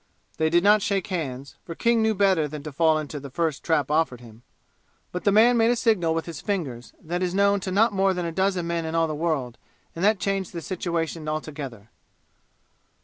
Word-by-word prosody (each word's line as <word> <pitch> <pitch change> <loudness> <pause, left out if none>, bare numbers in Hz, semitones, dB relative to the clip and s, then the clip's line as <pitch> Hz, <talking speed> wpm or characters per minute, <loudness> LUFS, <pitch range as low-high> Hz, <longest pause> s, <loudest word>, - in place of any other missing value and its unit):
They 160 0 +2
did 175 +2 +3
not 210 +1 +5
shake 195 -2 0
hands, 140 -5 -4
for 165 - -8
King 235 +3 +2
knew 220 0 +2
better 190 -6 +3
than 150 0 -8
to 155 - -6
fall 160 +2 +3
into 150 -1 -5
the 140 0 -9
first 160 +1 -2
trap 150 -4 +1
offered 150 -6 +1
him. 115 -2 -15 0.7
But 180 - -5
the 200 - +5
man 235 +4 +5
made 225 0 +4
a 245 - +3
signal 205 -9 +1
with 165 - -2
his 165 -4 -7
fingers 140 - -4
that 175 +3 -4
is 180 0 -1
known 200 0 +3
to 190 0 -5
not 210 +4 +3
more 195 0 +2
than 180 -1 -2
a 165 - -2
dozen 190 0 0
men 170 0 -2
in 160 0 -4
all 165 0 +3
the 155 - -3
world, 150 -6 -2 0.4
and 170 - -4
that 210 +1 +4
changed 195 -2 -2
the 170 - -5
situation 165 -2 -3
altogether. 140 -8 -6
170 Hz, 215 wpm, -25 LUFS, 155-195 Hz, 0.7 s, not